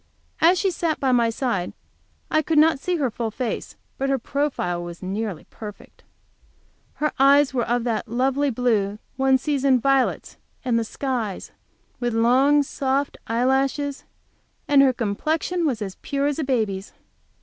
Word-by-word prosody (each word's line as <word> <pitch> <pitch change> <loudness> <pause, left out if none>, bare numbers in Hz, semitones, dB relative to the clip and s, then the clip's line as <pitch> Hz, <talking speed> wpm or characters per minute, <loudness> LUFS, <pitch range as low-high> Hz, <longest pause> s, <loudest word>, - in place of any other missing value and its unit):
As 345 +3 +5
she 385 +1 +1
sat 330 -2 -1
by 265 -2 +1
my 235 -2 +3
side 225 -6 -2 0.6
I 310 - +3
could 315 +1 -1
not 315 -1 +5
see 360 +5 -1
her 275 -7 0
full 230 0 -3
face, 240 +2 -4 0.2
but 275 0 0
her 270 - +2
profile 260 -10 -2
was 175 +1 -8
nearly 195 -2 -4
perfect. 210 -2 -11 0.9
Her 300 0 0
eyes 280 +1 +5
were 245 -2 0
of 240 0 +1
that 230 -2 -2
lovely 265 +5 +1
blue 220 -5 0 0.2
one 265 0 +3
sees 275 0 -2
in 265 -2 +4
violets 270 +1 +1 0.3
and 235 -2 +2
the - - 0
skies, 230 -4 -4 0.5
with 240 -2 -1
long, 265 +6 +4
soft 275 +1 -2
eye 230 +2 0
lashes, 275 +2 0 0.6
and 285 -1 +6
her 270 -1 +5
complexion 310 - -1
was 235 -6 -1
as 195 -2 -5
pure 280 0 -1
as 290 +1 0
a - - 0
baby's. 215 -7 -1
260 Hz, 160 wpm, -23 LUFS, 230-285 Hz, 0.9 s, and